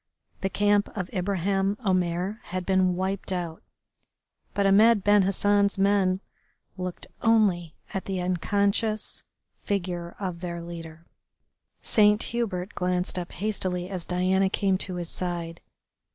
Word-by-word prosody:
The 195 - -1
camp 205 +1 +2
of 180 -3 -3
Ibraheim 195 +1 0
Omair 185 +2 0
had 185 0 -4
been 185 -2 +3
wiped 190 +1 -2
out, 170 -3 -3 0.9
but 200 - +2
Ahmed 210 +2 +5
Ben 205 0 +5
Hassan's 200 +1 +2
men 195 -1 +2 0.5
looked 180 -1 -5 0.2
only 200 -8 +3 0.2
at 195 - -3
the 190 -1 -2
unconscious 200 +4 0 0.4
figure 175 -4 -3
of 180 -4 -3
their 170 -1 -4
leader. 165 -1 -9 0.8
Saint 210 -1 +4
Hubert 200 -6 -2
glanced 180 0 0
up 175 - -6
hastily 185 -3 -2
as 185 -3 -2
Diana 185 +2 +2
came 195 -1 +1
to 185 -2 -3
his 175 -1 -4
side. 170 -2 -4
185 Hz, 125 wpm, -26 LUFS, 180-200 Hz, 0.9 s, Ahmed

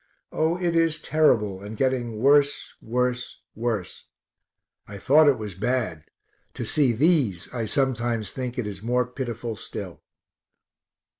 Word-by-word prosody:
Oh, 160 +2 +1
it 175 -2 -1
is 165 -2 +2
terrible, 115 -11 +2
and 105 +2 -8
getting 125 -4 0
worse, 140 +4 +3
worse, 125 +1 -2
worse. 110 -5 -4 0.8
I 100 - -8
thought 150 +9 +5
it 140 - +4
was 105 -3 -6
bad; 105 -6 -2 0.5
to - - -4
see 140 -5 +3
these 125 - +1
I 115 -3 -2
sometimes 120 -4 0
think 125 -1 -5
is 105 -5 -4
more 125 +2 +1
pitiful 120 -3 -5
still. 95 -5 -8
125 Hz, 130 wpm, -25 LUFS, 110-140 Hz, 0.8 s, thought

